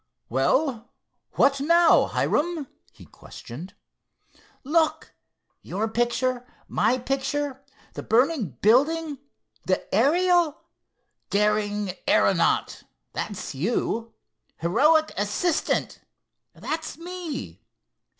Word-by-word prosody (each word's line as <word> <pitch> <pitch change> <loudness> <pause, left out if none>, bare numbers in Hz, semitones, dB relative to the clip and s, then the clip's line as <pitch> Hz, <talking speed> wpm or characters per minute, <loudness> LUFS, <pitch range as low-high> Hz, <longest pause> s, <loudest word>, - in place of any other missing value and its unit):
"Well, 225 - 0 0.4
what 275 0 +3
now, 335 +3 +5
Hiram?" 325 -1 0 0.3
he - - -16
questioned. 155 +11 -11 0.9
"Look—your 290 - -3
picture, 240 +2 0 0.2
my 250 - +1
picture, 270 +1 -2 0.3
the - - -6
burning 235 - +1
building, 290 +6 +3 0.5
the 185 - +3 0.2
Ariel. 335 - +3 0.7
'Daring 210 -1 0
aeronaut'—that's 200 -6 0
you. 225 - -2 0.4
'Heroic 305 - +3
assistant'—that's 315 - -3
me. 340 -4 -7
265 Hz, 70 wpm, -25 LUFS, 210-315 Hz, 0.9 s, now